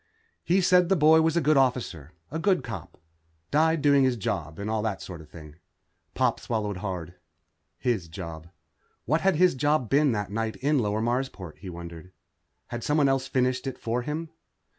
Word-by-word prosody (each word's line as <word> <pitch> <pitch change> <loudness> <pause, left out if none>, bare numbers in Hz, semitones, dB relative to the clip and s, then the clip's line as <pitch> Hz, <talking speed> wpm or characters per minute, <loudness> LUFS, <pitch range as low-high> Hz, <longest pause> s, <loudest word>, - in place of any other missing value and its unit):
He'd 185 +3 +3
said 180 -1 +4
the 195 - +4
boy 160 0 +6
was 160 +1 +2
a - - +3
good 155 -1 +4
officer. 120 - 0 0.2
A 160 - -3
good 185 +1 +2
cop. 100 -9 -8 0.5
Died 160 0 +3
doing 140 -2 +5
his 130 -2 +2
job, 80 -6 -3
and 100 - -5
all 110 0 0
that 105 -2 -2
sort 85 -4 -8
of 75 - -15
thing. 75 -2 -12 0.6
Pop - - +1
swallowed 105 -4 -2
hard. 90 -3 -5 0.6
His 115 -9 -1
job. 80 -1 -8 0.6
What 155 +3 +1
had 195 -2 +3
'his 180 +3 +4
job' 145 -2 0
been 145 0 +4
that 105 -2 -3
night 110 +1 -2
in 145 +1 +1
Lower 105 -1 0
Marsport, 120 - -3
he 95 - -8
wondered. 85 0 -9 0.6
Had 120 -1 -5
someone 150 -2 +3
else 135 -1 0
finished 130 +1 0
it 130 - -4
for 120 +2 -2
him? 155 +5 -4
125 Hz, 185 wpm, -27 LUFS, 95-150 Hz, 0.6 s, boy